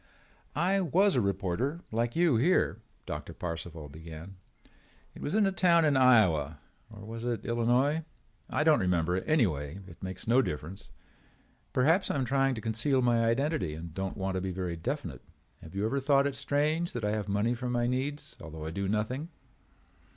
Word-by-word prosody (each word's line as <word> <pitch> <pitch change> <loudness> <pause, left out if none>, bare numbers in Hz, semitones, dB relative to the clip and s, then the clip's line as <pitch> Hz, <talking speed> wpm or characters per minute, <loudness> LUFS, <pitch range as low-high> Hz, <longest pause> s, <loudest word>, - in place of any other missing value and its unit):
"I 185 +6 +2
was 190 +4 +3
a 125 - +3
reporter 100 - -1
like 115 +1 -1
you 170 -5 +4
here," 170 +11 +2 0.2
Doctor - - -6
Parcival 85 -2 -5
began. 80 +5 -10 0.8
"It - - -12
was 145 - -2
in 215 -1 +4
a 195 - +2
town 170 -3 +4
in 145 -2 +3
Iowa—or 105 - +2
was 115 +1 -7
it 120 -3 -2
in - - -6
Illinois? 125 +7 +2 0.5
I - - +1
don't 155 -1 +5
remember 90 -1 +1
and 95 - -5
anyway 90 - +1
it 85 -3 -14
makes 95 +1 -6
no 125 +3 +5
difference. 80 - -6 0.8
Perhaps 160 +9 +3
I - - 0
am 135 -2 0
trying 135 +1 +2
to 110 - -6
conceal 120 +5 +1
my 120 -1 +3
identity 115 - 0
and 80 0 -8
don't 95 +1 -4
want 95 0 -2
to 95 - -1
be 95 0 -2
very 90 -2 -3
definite. 90 - -4 0.4
Have 80 +3 -12
you 100 +2 0
ever 140 +5 0
thought 140 0 +3
it 140 - 0
strange 150 +5 0
that 120 -3 -3
I 105 - +1
have 105 -1 -2
money 105 +4 +1
for 125 +1 -4
my 120 -1 +1
needs 135 +4 -2
although 80 -1 -8
I 80 - -4
do 100 +3 -2
nothing? 110 - -2
115 Hz, 185 wpm, -30 LUFS, 90-140 Hz, 0.8 s, don't